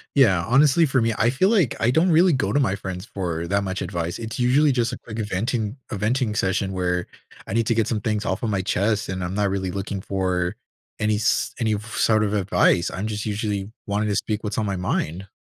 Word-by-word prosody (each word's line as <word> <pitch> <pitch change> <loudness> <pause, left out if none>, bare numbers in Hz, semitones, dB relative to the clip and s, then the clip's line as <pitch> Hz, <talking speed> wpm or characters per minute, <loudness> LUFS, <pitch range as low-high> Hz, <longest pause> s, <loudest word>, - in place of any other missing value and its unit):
Yeah. 100 -11 +4
Honestly, 140 +6 +5
for 130 -3 +1
me, 115 0 +1
I 115 - +3
feel 165 +10 +2
like 190 - +2
I 115 - +3
don't 160 +7 +3
really 170 +2 +5
go 135 - 0
to 145 - +2
my 105 -9 +1
friends 95 -1 -6
for 85 -5 -4
that 100 +2 +1
much 95 -1 -3
advice. 85 -2 -3
It's 115 +1 -6
usually 140 +5 +4
just 120 -3 0
a - - -4
quick 110 -1 -8
venting 110 +3 -2
a 110 - -2
venting 115 +2 0
session 95 0 0
where 90 -1 -1 0.4
I - - -4
need 115 -1 +1
to 115 - +2
get 115 -2 +1
some 110 -2 -1
things 105 -1 -1
off 95 - -1
of 115 - 0
my 100 -3 0
chest, 100 +3 0
and 95 -1 -3
I'm 90 +2 -3
not 100 -1 +1
really 95 -1 -2
looking 100 +1 -4
for 95 -1 -1 0.4
any 110 -1 +1
s 105 - +1
any 110 -3 +1
sort 110 0 +1
of 105 -1 -1
advice. 95 -3 +2
I'm 95 - -4
just 105 -1 -4
usually 105 -1 -2
wanting 105 +1 -1
to 100 - 0
speak 105 +2 -2
what's 105 - -3
on 110 - 0
my 100 -1 -1
mind. 90 0 -2
105 Hz, 235 wpm, -23 LUFS, 95-115 Hz, 0.4 s, Honestly